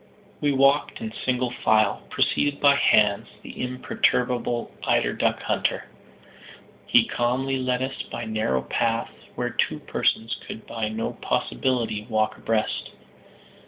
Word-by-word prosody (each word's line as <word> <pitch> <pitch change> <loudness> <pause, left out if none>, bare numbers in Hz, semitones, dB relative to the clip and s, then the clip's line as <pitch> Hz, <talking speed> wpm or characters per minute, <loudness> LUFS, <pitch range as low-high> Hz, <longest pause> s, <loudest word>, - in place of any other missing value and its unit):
We 145 - +2
walked 135 +1 +3
in 225 -2 -5
single 125 -1 -1
file, 110 -2 +3
preceded 145 -1 +1
by 140 -1 +6
Hans, 105 -7 +3 0.2
the - - -8
imperturbable 125 -1 0
eider - - +2
duck - - 0
hunter. - - 0 1.0
He - - +5
calmly 130 +3 0
led 125 0 0
us 135 +1 -4
by 120 - -4
narrow 110 -13 0
paths 115 - -1 0.2
where - - -2
two - - 0
persons 115 +1 0
could 110 - -8
by 110 -2 -3
no 110 +1 -3
possibility 110 - -1
walk 110 -1 +1
abreast. 110 -1 -1
120 Hz, 125 wpm, -25 LUFS, 110-130 Hz, 1.0 s, by